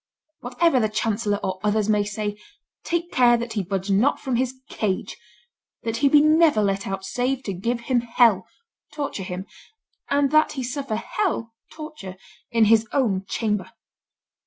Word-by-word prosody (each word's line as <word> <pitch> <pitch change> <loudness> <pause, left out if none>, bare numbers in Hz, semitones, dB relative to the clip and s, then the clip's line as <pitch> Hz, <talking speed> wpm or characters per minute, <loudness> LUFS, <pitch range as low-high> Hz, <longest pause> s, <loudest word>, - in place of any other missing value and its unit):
Whatever 265 +4 +2
the 215 -2 +1
chancellor 215 -1 -1
or 185 0 -2
others 210 0 +1
may 210 -1 +3
say, 210 0 -3 0.5
take 345 0 -2
care 240 -1 +5
that 235 0 -5
he 210 - 0
budge 195 +1 -3
not 220 +9 +3
from 260 -2 -2
his 260 +1 -1
cage, 205 -10 -2 0.7
that 230 0 -2
he 280 - +3
be 295 +1 +6
never 310 -4 +4
let 195 -1 -1
out 195 0 -4
save 250 +6 -1
to 200 - -3
give 235 +6 -2
him 245 +1 +1
hell 230 -5 +3 0.4
(torture 285 -8 -4
him), 185 0 -5 0.6
and 280 -1 +2
that 310 0 +4
he 265 - -4
suffer 260 -2 -3
hell 230 - -2 0.2
(torture) 305 - -9 0.3
in 230 -2 +3
his 225 +1 +4
own 200 -9 0
chamber." 210 -5 -1
230 Hz, 160 wpm, -23 LUFS, 205-265 Hz, 0.7 s, be